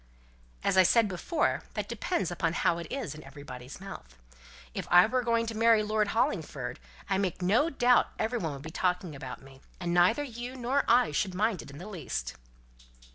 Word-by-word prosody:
"As -, -, +2 dB
I -, -, +9 dB
said 225 Hz, +4 st, +4 dB
before, 205 Hz, -, 0 dB
that -, -, -2 dB
depends 195 Hz, -, -2 dB
upon 165 Hz, -1 st, -1 dB
how 170 Hz, 0 st, +1 dB
it 170 Hz, -, -6 dB
is 255 Hz, -, -3 dB
in 155 Hz, -, -11 dB
everybody's 135 Hz, -2 st, -10 dB
mouth. 60 Hz, -, -10 dB, 0.6 s
If -, -, -4 dB
I 175 Hz, +1 st, +8 dB
were 255 Hz, +3 st, 0 dB
going 230 Hz, -1 st, +1 dB
to 225 Hz, -1 st, -4 dB
marry 225 Hz, -1 st, +4 dB
Lord 210 Hz, 0 st, +1 dB
Hollingford, 150 Hz, -, -1 dB, 0.3 s
I 195 Hz, -1 st, +1 dB
make 185 Hz, -2 st, -2 dB
no 225 Hz, -, +3 dB
doubt 250 Hz, -4 st, +4 dB
every 235 Hz, +2 st, -1 dB
one 160 Hz, -6 st, -2 dB
would 140 Hz, 0 st, -9 dB
be 160 Hz, -, -7 dB
talking 180 Hz, -2 st, -1 dB
about 130 Hz, -1 st, -8 dB
me, 135 Hz, 0 st, -15 dB, 0.2 s
and 175 Hz, -1 st, -2 dB
neither 180 Hz, +11 st, +4 dB
you 245 Hz, -1 st, -6 dB
nor 260 Hz, +3 st, 0 dB
I 240 Hz, -5 st, +4 dB
should 185 Hz, +5 st, -1 dB
mind 210 Hz, -1 st, +1 dB
it -, -, -12 dB
in 140 Hz, -, -10 dB
the 175 Hz, -, -8 dB
least." 155 Hz, -, -4 dB
190 Hz, 195 wpm, -29 LUFS, 160-230 Hz, 0.6 s, I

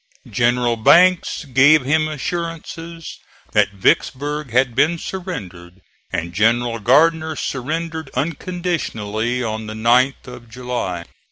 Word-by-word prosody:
General 120 Hz, -1 st, +1 dB
Banks 175 Hz, +8 st, +4 dB
gave 135 Hz, +2 st, +4 dB
him 155 Hz, +3 st, +2 dB
assurances 165 Hz, +1 st, -6 dB, 0.3 s
that -, -, +2 dB
Vicksburg 145 Hz, +8 st, 0 dB
had 125 Hz, +1 st, +2 dB
been 155 Hz, +7 st, +2 dB
surrendered, 95 Hz, -, -7 dB, 0.3 s
and 85 Hz, +1 st, -3 dB
General 115 Hz, +3 st, +1 dB
Gardner 160 Hz, +7 st, +3 dB
surrendered 160 Hz, +4 st, -4 dB
unconditionally 130 Hz, -, -2 dB
on 110 Hz, -1 st, -4 dB
the 110 Hz, -, -6 dB
9th 125 Hz, +4 st, +2 dB
of 125 Hz, -2 st, -11 dB
July. 120 Hz, -8 st, -4 dB
130 Hz, 105 wpm, -19 LUFS, 115-160 Hz, 0.3 s, Banks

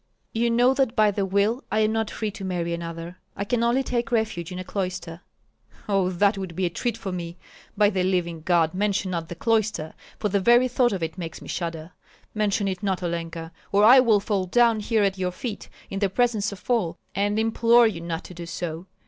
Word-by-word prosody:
"You 235 Hz, +1 st, +1 dB
know 245 Hz, +3 st, +4 dB
that 265 Hz, -3 st, 0 dB
by 215 Hz, -2 st, +4 dB
the 195 Hz, -1 st, -1 dB
will 205 Hz, +7 st, +1 dB
I 220 Hz, -, +2 dB
am 215 Hz, 0 st, +2 dB
not 220 Hz, -1 st, -1 dB
free 215 Hz, -2 st, -3 dB
to 200 Hz, -1 st, -9 dB
marry 175 Hz, -2 st, -2 dB
another. 170 Hz, +1 st, -6 dB, 0.2 s
I 200 Hz, -, -2 dB
can 235 Hz, +3 st, 0 dB
only 240 Hz, +3 st, +2 dB
take 240 Hz, -1 st, -2 dB
refuge 220 Hz, -7 st, -1 dB
in 180 Hz, -, -5 dB
a 185 Hz, -, -4 dB
cloister." 185 Hz, -3 st, -4 dB, 0.7 s
"Oh, 195 Hz, -3 st, +2 dB
that 195 Hz, +3 st, +2 dB
would 185 Hz, -3 st, -6 dB
be 185 Hz, -, 0 dB
a 175 Hz, -, -1 dB
treat 235 Hz, +5 st, -2 dB
for 195 Hz, -4 st, -5 dB
me! 175 Hz, -1 st, -5 dB, 0.4 s
By 205 Hz, 0 st, +4 dB
the 190 Hz, -2 st, 0 dB
living 175 Hz, -3 st, -1 dB
God, 165 Hz, -1 st, +2 dB
mention 195 Hz, -1 st, 0 dB
not 165 Hz, -2 st, -3 dB
the 175 Hz, -, -6 dB
cloister, 215 Hz, -6 st, 0 dB, 0.2 s
for 215 Hz, -, -1 dB
the 200 Hz, +1 st, +1 dB
very 240 Hz, +5 st, +5 dB
thought 250 Hz, 0 st, +2 dB
of 190 Hz, -4 st, -2 dB
it 165 Hz, +3 st, -4 dB
makes 165 Hz, -2 st, -6 dB
me -, -, -12 dB
shudder. 165 Hz, -1 st, -4 dB, 0.4 s
Mention 210 Hz, -1 st, 0 dB
it 190 Hz, -1 st, -3 dB
not, 190 Hz, -3 st, -1 dB
Olenka, 165 Hz, -1 st, -4 dB, 0.2 s
or 200 Hz, +1 st, +4 dB
I 255 Hz, +4 st, +9 dB
will 230 Hz, -5 st, +4 dB
fall 200 Hz, -2 st, -1 dB
down 235 Hz, +2 st, +4 dB
here 215 Hz, 0 st, +1 dB
at 195 Hz, -1 st, 0 dB
your 180 Hz, -1 st, 0 dB
feet 220 Hz, +3 st, -6 dB, 0.2 s
in 195 Hz, -, -3 dB
the 200 Hz, -1 st, +1 dB
presence 215 Hz, -1 st, +1 dB
of 200 Hz, -, -11 dB
all, 225 Hz, -9 st, 0 dB, 0.2 s
and 205 Hz, +2 st, 0 dB
implore 230 Hz, +2 st, +4 dB
you 195 Hz, -7 st, -1 dB
not 165 Hz, 0 st, -4 dB
to -, -, -11 dB
do 170 Hz, -1 st, -8 dB
so. 170 Hz, +1 st, -5 dB
195 Hz, 225 wpm, -25 LUFS, 175-220 Hz, 0.7 s, I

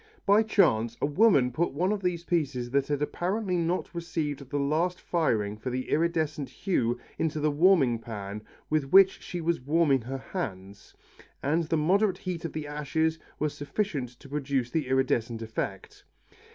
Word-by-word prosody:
By 205 Hz, +2 st, +6 dB
chance 120 Hz, -, +2 dB
a -, -, +1 dB
woman 145 Hz, -, +4 dB
put 165 Hz, +6 st, -1 dB
one 180 Hz, +7 st, +1 dB
of 210 Hz, -2 st, -1 dB
these 180 Hz, -2 st, -1 dB
pieces 140 Hz, -9 st, -1 dB
that 140 Hz, 0 st, +1 dB
had 145 Hz, 0 st, 0 dB
apparently 185 Hz, +5 st, -1 dB
not 175 Hz, +2 st, -1 dB
received 150 Hz, -5 st, -3 dB
the 145 Hz, -, -2 dB
last 160 Hz, +6 st, 0 dB
firing 110 Hz, -, 0 dB
for 130 Hz, -, -4 dB
the 130 Hz, +1 st, -4 dB
iridescent 155 Hz, -4 st, 0 dB
hue 125 Hz, -, 0 dB, 0.2 s
into 155 Hz, -1 st, 0 dB
the 150 Hz, 0 st, +2 dB
warming 145 Hz, -7 st, +4 dB
pan 105 Hz, -2 st, -6 dB, 0.3 s
with 150 Hz, -3 st, -1 dB
which 195 Hz, 0 st, +6 dB
she 175 Hz, -, -5 dB
was 165 Hz, -3 st, 0 dB
warming 145 Hz, -1 st, +3 dB
her 130 Hz, +4 st, -5 dB
hands, 100 Hz, -, -6 dB, 0.5 s
and 160 Hz, +4 st, +1 dB
the 160 Hz, +1 st, 0 dB
moderate 185 Hz, +5 st, +2 dB
heat 180 Hz, -3 st, -5 dB
of 165 Hz, -, -4 dB
the 155 Hz, -1 st, -4 dB
ashes 155 Hz, +2 st, -1 dB, 0.2 s
was 150 Hz, -1 st, -1 dB
sufficient 145 Hz, -, -2 dB
to -, -, -13 dB
produce 135 Hz, -3 st, -2 dB
the 155 Hz, -5 st, -1 dB
iridescent 120 Hz, -3 st, 0 dB
effect. 110 Hz, -3 st, -5 dB
150 Hz, 165 wpm, -28 LUFS, 130-170 Hz, 0.5 s, By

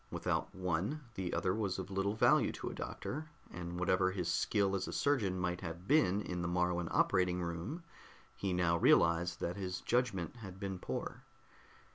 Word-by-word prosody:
Without -, -, -2 dB
one 95 Hz, -, -1 dB
the 95 Hz, -4 st, -3 dB
other 90 Hz, 0 st, +1 dB
was 100 Hz, -3 st, -1 dB
of 95 Hz, +1 st, -5 dB
little 95 Hz, +2 st, 0 dB
value -, -, +4 dB
to -, -, -5 dB
a -, -, -7 dB
doctor, 155 Hz, +3 st, -5 dB, 0.2 s
and 90 Hz, 0 st, -5 dB
whatever 95 Hz, 0 st, +3 dB
his 95 Hz, -3 st, -2 dB
skill 100 Hz, -2 st, +2 dB
as 95 Hz, -, -2 dB
a -, -, -4 dB
surgeon 115 Hz, -10 st, +1 dB
might 90 Hz, 0 st, -1 dB
have 85 Hz, +1 st, -6 dB
been 105 Hz, -10 st, +4 dB
in 90 Hz, -1 st, -3 dB
the 85 Hz, -, -1 dB
Moruan 90 Hz, 0 st, +1 dB
operating 90 Hz, -1 st, +2 dB
room, 85 Hz, -, -4 dB, 0.5 s
he 100 Hz, -, -2 dB
now 90 Hz, -1 st, +2 dB
realized 85 Hz, +1 st, +4 dB
that 90 Hz, +3 st, -2 dB
his 90 Hz, -2 st, -3 dB
judgment 120 Hz, -5 st, 0 dB
had 95 Hz, -5 st, -9 dB
been 95 Hz, -2 st, -4 dB
poor. -, -, -4 dB
95 Hz, 175 wpm, -35 LUFS, 90-100 Hz, 0.5 s, value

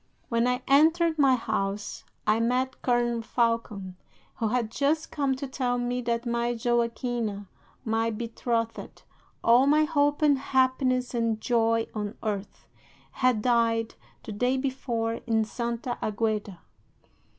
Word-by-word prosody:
"'When 230 Hz, +1 st, +2 dB
I 250 Hz, 0 st, 0 dB
entered 320 Hz, +3 st, +4 dB
my 270 Hz, -2 st, +5 dB
house 205 Hz, -3 st, -3 dB, 0.2 s
I 215 Hz, +1 st, +3 dB
met 250 Hz, +3 st, 0 dB
Colonel 240 Hz, -1 st, +1 dB
Falcon, 225 Hz, -5 st, -1 dB, 0.4 s
who 225 Hz, -, 0 dB
had 230 Hz, -1 st, -1 dB
just 305 Hz, +5 st, 0 dB
come 275 Hz, -3 st, 0 dB
to 265 Hz, -, -5 dB
tell 255 Hz, -2 st, -1 dB
me 245 Hz, +1 st, -1 dB
that 235 Hz, 0 st, -1 dB
my 235 Hz, 0 st, 0 dB
Joaquina, 235 Hz, -3 st, -1 dB, 0.4 s
my 225 Hz, 0 st, +1 dB
betrothed, 230 Hz, 0 st, -3 dB, 0.4 s
all 245 Hz, +4 st, +5 dB
my 305 Hz, +2 st, +5 dB
hope 290 Hz, -1 st, +1 dB
and 285 Hz, -3 st, +4 dB
happiness 260 Hz, -1 st, +1 dB
and 230 Hz, -2 st, 0 dB
joy 230 Hz, -1 st, +2 dB
on 210 Hz, +1 st, -4 dB
earth, 205 Hz, -2 st, -4 dB, 0.4 s
had 255 Hz, -5 st, +1 dB
died 230 Hz, -2 st, +2 dB, 0.3 s
the -, -, -7 dB
day 245 Hz, +5 st, 0 dB
before 245 Hz, -4 st, -2 dB
in 220 Hz, -1 st, +2 dB
Santa 235 Hz, +2 st, -4 dB
Agueda. 210 Hz, -4 st, -2 dB
235 Hz, 130 wpm, -27 LUFS, 225-260 Hz, 0.4 s, my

